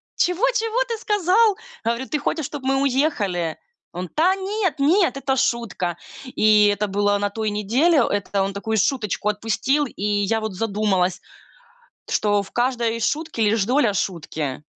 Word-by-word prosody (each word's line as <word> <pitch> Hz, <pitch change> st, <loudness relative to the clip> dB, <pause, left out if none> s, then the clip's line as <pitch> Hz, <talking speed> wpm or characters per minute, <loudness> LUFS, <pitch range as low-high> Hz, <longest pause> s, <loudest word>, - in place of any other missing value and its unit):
Чего 360 Hz, +7 st, +1 dB
чего 455 Hz, 0 st, -1 dB
ты 460 Hz, -, -3 dB
сказал?" 415 Hz, 0 st, +2 dB, 0.3 s
Говорю: 235 Hz, +3 st, -1 dB
"Ты 300 Hz, -, -1 dB
хочешь, 315 Hz, 0 st, -2 dB
чтоб 290 Hz, -2 st, -7 dB
мы 270 Hz, +1 st, +1 dB
уехали?" 215 Hz, -, 0 dB, 0.4 s
Он: 180 Hz, +1 st, -5 dB
"Та 360 Hz, +5 st, +2 dB
нет, 390 Hz, -1 st, -2 dB
нет, 325 Hz, +1 st, +3 dB
это 270 Hz, -1 st, -1 dB
шутка". 205 Hz, -9 st, -1 dB, 0.3 s
И 215 Hz, -4 st, +4 dB
это 205 Hz, +1 st, 0 dB
было 205 Hz, +1 st, +1 dB
на 205 Hz, 0 st, -1 dB
той 215 Hz, +1 st, -2 dB
неделе. 240 Hz, -, +2 dB
Это 200 Hz, -1 st, -1 dB
он 195 Hz, 0 st, -3 dB
такую 220 Hz, +2 st, -2 dB
шуточку 210 Hz, -2 st, 0 dB
отпустил. 225 Hz, +7 st, 0 dB
И 220 Hz, -6 st, -8 dB
я 210 Hz, +1 st, +1 dB
вот 220 Hz, -3 st, -4 dB
задумалась, 200 Hz, -4 st, 0 dB, 0.9 s
что 205 Hz, -1 st, +1 dB
в -, -, -15 dB
каждой 240 Hz, -2 st, 0 dB
шутке 295 Hz, -1 st, -1 dB
лишь 215 Hz, 0 st, +2 dB
доля 245 Hz, -4 st, +2 dB
шутки. 155 Hz, -7 st, -3 dB
225 Hz, 155 wpm, -22 LUFS, 205-295 Hz, 0.9 s, И